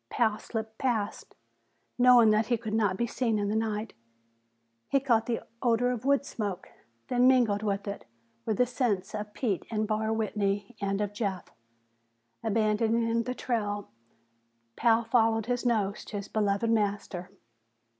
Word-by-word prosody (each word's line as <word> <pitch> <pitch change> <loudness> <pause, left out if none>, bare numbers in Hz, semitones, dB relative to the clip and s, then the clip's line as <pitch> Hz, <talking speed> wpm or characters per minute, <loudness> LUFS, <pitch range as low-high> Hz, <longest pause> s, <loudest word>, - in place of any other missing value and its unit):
Pal 220 -3 +1
slipped 220 -1 -6
past, 225 -6 -2 0.6
knowing 245 -3 +7
that 215 +1 +2
he 240 - +2
could 220 -1 -5
not 205 -4 +1
be 235 - +1
seen 235 -2 0
in 205 -1 -1
the 210 - 0
night. 220 0 -2 1.0
He 275 - +3
caught 235 -4 +2
the 235 -2 -1 0.2
odor 245 0 +2
of 245 0 -4
wood 280 0 +3
smoke. 200 -7 -4 0.4
Then, 250 0 +3
mingled 240 -6 +4
with 200 -1 -2
it, 200 - -5 0.4
were 215 - -1
the 250 - +3
scents 220 -6 -1
of 210 0 -5
Pete 210 -8 -1
and 215 -1 -1
Barr 220 0 0
Whitney 205 0 -1
and 200 0 -1
of 205 -1 -2
Jeff. 200 -4 -3 0.9
Abandoning 225 +1 +1
the 250 +2 -4
trail, 205 - -2 0.8
Pal 230 0 +3
followed 225 -1 +2
his 245 +1 -1
nose 210 -4 0
to 210 - -5
his 200 - -6
beloved 210 +1 0
master. 200 -4 -1
220 Hz, 155 wpm, -29 LUFS, 205-235 Hz, 1.0 s, knowing